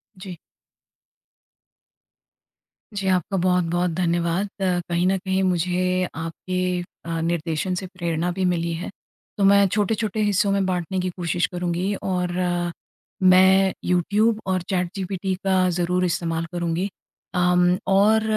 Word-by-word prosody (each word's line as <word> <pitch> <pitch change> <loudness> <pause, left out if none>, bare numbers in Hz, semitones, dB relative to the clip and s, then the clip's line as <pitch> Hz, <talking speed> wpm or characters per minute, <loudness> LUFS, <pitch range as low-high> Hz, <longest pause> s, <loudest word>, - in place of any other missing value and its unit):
जी। 185 -2 -9 2.6
जी, 200 -1 -3
आपका 185 +1 0
बहुत-बहुत 180 -1 +1
धन्यवाद। 170 +2 0
अ, 180 -2 +1
कहीं 170 +1 +1
न 190 +1 +2
कहीं 190 0 -1
मुझे 180 0 +1
आपके 180 +2 -2 0.2
अ, 165 -1 -2
निर्देशन 170 +2 -1
से 190 - -7
प्रेरणा 175 -2 -2
भी 190 +2 -2
मिली 170 -1 0
है। 165 - -5 0.5
तो 200 - +1
मैं 200 0 +6
छोटे-छोटे 215 +1 0
हिस्सों 200 -1 +2
में 195 -1 +1
बाँटने 185 0 -2
की 185 0 -1
कोशिश 175 0 0
करूँगी 180 +2 -2
और 180 -2 -1
अ, 175 -1 0 0.5
मैं 190 +1 +6
यूट्यूब 205 +5 +2
और 185 -1 +1
चैटजीपीटी 190 0 -2
का 185 -1 +3
ज़रूर 180 +1 +1
इस्तेमाल 165 -1 -1
करूँगी। 175 +2 -1 0.5
अम 180 0 +3 0.2
और 210 +3 +4
180 Hz, 125 wpm, -23 LUFS, 175-190 Hz, 2.6 s, मैं